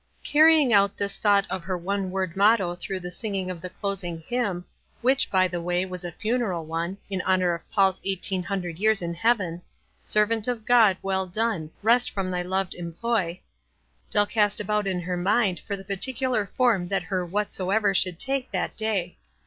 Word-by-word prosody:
Carrying 305 -4 +5
out 200 -1 +4
this 200 0 -2
thought 200 -2 +3
of 185 - -2
her 185 +1 -3
one 195 +2 -2
word 185 -2 -3
motto 200 -3 +3
through 185 +2 -5
the 180 0 -7
singing 190 -1 -3
of 170 -3 -8
the 180 - -6
closing 185 -3 -4
hvran, 200 -1 -2 0.4
which, 260 +2 +3
by 185 -1 +3
the 175 -1 -4
way, 175 +1 0
was 180 -1 -6
a 175 - -5
funeral 215 -4 -2
one, 165 +4 -3
in 195 -2 -2
honor 185 -2 +2
of 170 - -8
Paul's 195 -2 +2
eighteen 190 -1 0
hundred 180 -3 -4
years 215 -2 +2
in 170 0 -3
heaven 180 -3 0
— - - -41
" - - -41
Servant 215 +1 +1
of 235 -3 -3
God, 225 -6 +5
well 190 -1 0
done, 200 -4 -1
Rest 240 +3 +4
from 190 -2 -3
thy 180 0 -1
loved 190 +1 -1
employ," 175 +1 -2 0.7
Dell 205 - +3
cast 205 -1 +1
about 210 0 -1
in 185 -2 -1
her 180 +1 -3
mind 195 0 +1
for 200 -2 -4
the 195 - -11
particular 245 +2 -1
form 225 -9 +1
that 195 0 -1
her 180 0 -2
"Whatsoever" 200 +2 0
should 185 -2 +1
take 270 +4 -2
that - - -3
day. 205 -5 -2
195 Hz, 190 wpm, -25 LUFS, 180-215 Hz, 0.7 s, Carrying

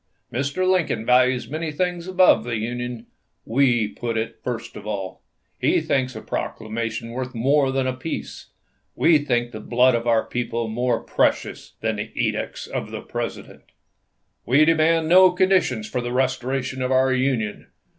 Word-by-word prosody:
Mr. 140 +9 -1
Lincoln 180 -11 +1
values 125 0 +3
many 155 +2 -3
things 175 +2 -2
above 185 -10 +4
the 115 -1 -2
Union; 120 +1 -4 0.4
we 120 -3 +2
put 115 +2 -4
it 110 +1 -3
first 120 -2 -5
of 105 - -9
all. 95 -3 -5 0.4
He - - +3
thinks 130 -2 -1
a - - -6
proclamation 115 +1 -4
worth 130 +1 -5
more 135 +3 +2
than 130 -1 -1
peace; 160 +6 -6 0.5
we 165 -2 +4
think 120 -4 -1
the 110 - -7
blood 125 +3 +3
of 115 0 -1
our 115 -1 +3
people 115 -1 -3
more 120 +2 -1
precious - - -1
than - - -1
the - - -4
edicts - - -2
of - - -5
the - - -6
President... - - -6 0.8
We 140 +5 +4
demand 165 0 +3
no 185 +2 +7
conditions 180 - +2
for 125 - -2
the 120 0 -4
restoration 130 +1 -1
of 125 0 -1
our 130 0 +3
Union. 130 -5 -1
125 Hz, 155 wpm, -23 LUFS, 115-145 Hz, 0.8 s, no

